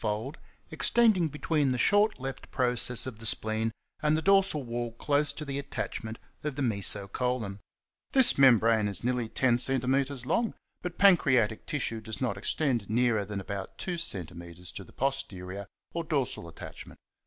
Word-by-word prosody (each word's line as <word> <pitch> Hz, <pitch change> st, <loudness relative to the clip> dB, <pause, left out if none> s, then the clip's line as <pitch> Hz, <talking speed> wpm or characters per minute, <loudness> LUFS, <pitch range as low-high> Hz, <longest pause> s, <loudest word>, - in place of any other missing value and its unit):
fold), 110 Hz, +7 st, -2 dB, 0.4 s
extending 220 Hz, -8 st, +4 dB
between 150 Hz, -1 st, 0 dB
the 125 Hz, -, 0 dB
short 205 Hz, -, +3 dB
left 135 Hz, +1 st, -6 dB
process 125 Hz, -2 st, 0 dB
of 125 Hz, -4 st, -7 dB
the 115 Hz, -, -9 dB
spleen 110 Hz, +1 st, 0 dB, 0.3 s
and 150 Hz, 0 st, +3 dB
the -, -, -1 dB
dorsal 195 Hz, -6 st, +4 dB
wall 120 Hz, -1 st, -4 dB
close 145 Hz, +4 st, +1 dB
to 150 Hz, -, -7 dB
the 140 Hz, 0 st, -3 dB
attachment 115 Hz, -5 st, -5 dB, 0.3 s
of 150 Hz, -3 st, -3 dB
the 145 Hz, -, -3 dB
meso 100 Hz, -3 st, 0 dB
colon. 125 Hz, -6 st, -2 dB, 0.5 s
This 265 Hz, -3 st, +6 dB
membrane 115 Hz, -5 st, +5 dB
is 100 Hz, +2 st, -2 dB
nearly 125 Hz, -2 st, 0 dB
10 120 Hz, -1 st, +2 dB
cm. 135 Hz, +1 st, 0 dB
long, 230 Hz, -, 0 dB, 0.3 s
but 180 Hz, -1 st, -5 dB
pancreatic 130 Hz, -, +4 dB
tissue 115 Hz, -6 st, -2 dB
does 110 Hz, -1 st, -7 dB
not 125 Hz, -6 st, -1 dB
extend 120 Hz, +1 st, 0 dB
nearer 110 Hz, -2 st, +2 dB
than 100 Hz, 0 st, -4 dB
about 100 Hz, 0 st, -6 dB
2 180 Hz, -, -2 dB
cm. 90 Hz, -, -4 dB
to 95 Hz, -, -6 dB
the -, -, -17 dB
pos 135 Hz, +1 st, 0 dB
terior, 95 Hz, -1 st, -8 dB, 0.3 s
or 170 Hz, -, -2 dB
dorsal 140 Hz, -, 0 dB
attachment. 80 Hz, -, -10 dB
125 Hz, 165 wpm, -29 LUFS, 110-145 Hz, 0.5 s, This